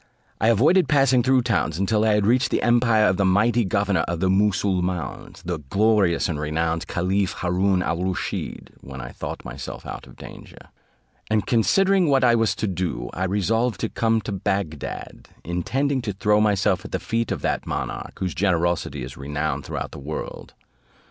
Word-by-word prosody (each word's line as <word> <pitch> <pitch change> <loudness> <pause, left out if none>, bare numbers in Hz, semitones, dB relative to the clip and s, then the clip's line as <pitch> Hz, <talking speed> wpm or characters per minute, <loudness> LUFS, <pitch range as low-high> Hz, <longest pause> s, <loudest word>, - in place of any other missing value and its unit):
I 110 - +2
avoided 150 - +4
passing 135 -4 +4
through 130 0 +3
towns, 90 -9 0
until 105 +3 +1
I 110 -1 +3
had 105 -1 +1
reached 125 +4 +3
the - - 0
empire 120 -2 +4
of 90 -2 +2
the 100 - +2
mighty 105 +5 +3
governor 100 -1 +1
of 85 -1 -2
the 95 +1 +2
Moosulmauns, 95 -3 -1
the 85 -2 -3
glorious 100 +4 +2
and 80 -4 -3
renowned 80 +3 -1
caliph 95 +1 0
Haroon 90 +1 +1
al 85 - -1
Rusheed, 90 0 -4
when 65 0 -9
I - - -7
thought - - -7
myself - - -7
out - - -7
of - - -15
danger; - - -12 0.7
and 110 -1 +1
considering 185 - +3
what 135 -2 +3
I 120 -1 +5
was 115 -2 +2
to 110 - -2
do, 85 -10 -3
I 95 - -2
resolved 105 +3 0
to - - -1
come 115 -1 +1
to 105 - -5
Bagdad, 95 -6 -4 0.2
intending 130 - -1
to 105 -4 -3
throw 105 +2 +2
myself 105 -3 +2
at - - -9
the - - -1
feet 115 -1 -2
of - - -3
that - - -1
monarch, - - -4
whose 95 -1 -2
generosity 85 -7 0
is 65 +1 -8
renowned 75 0 -3
throughout - - -5
the - - -9
world. 75 +3 -7
100 Hz, 180 wpm, -23 LUFS, 85-115 Hz, 0.7 s, I